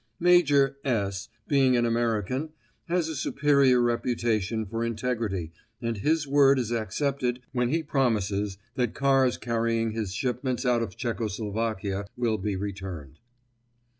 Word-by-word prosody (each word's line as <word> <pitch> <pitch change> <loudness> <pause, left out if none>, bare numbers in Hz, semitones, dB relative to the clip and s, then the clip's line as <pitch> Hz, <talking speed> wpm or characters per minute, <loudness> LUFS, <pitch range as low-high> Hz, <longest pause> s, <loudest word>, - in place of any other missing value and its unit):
Major 145 -6 +4
S., 100 -4 -1 0.2
being 135 -3 +4
an 120 - +2
American, 115 - 0 0.4
has 170 -1 0
a 160 - -4
superior 140 -2 +3
reputation 115 -3 0
for 115 +3 -3
integrity 115 -7 -2 0.3
and 115 -2 -2
His 150 +7 +1
word 140 -1 +5
is 120 -3 -1
accepted 125 +2 -1
when 125 -2 0
he 160 +4 0
promises 105 -8 0 0.2
that 125 -3 -1
cars 135 -2 +3
carrying 115 -1 0
his 110 -3 -3
shipments 125 +4 -2
out 120 -1 +3
of 115 - -5
Czechoslovakia 110 -3 -2
will 115 -3 0
be 100 0 -2
returned. 95 -7 -6
120 Hz, 130 wpm, -27 LUFS, 105-135 Hz, 0.4 s, word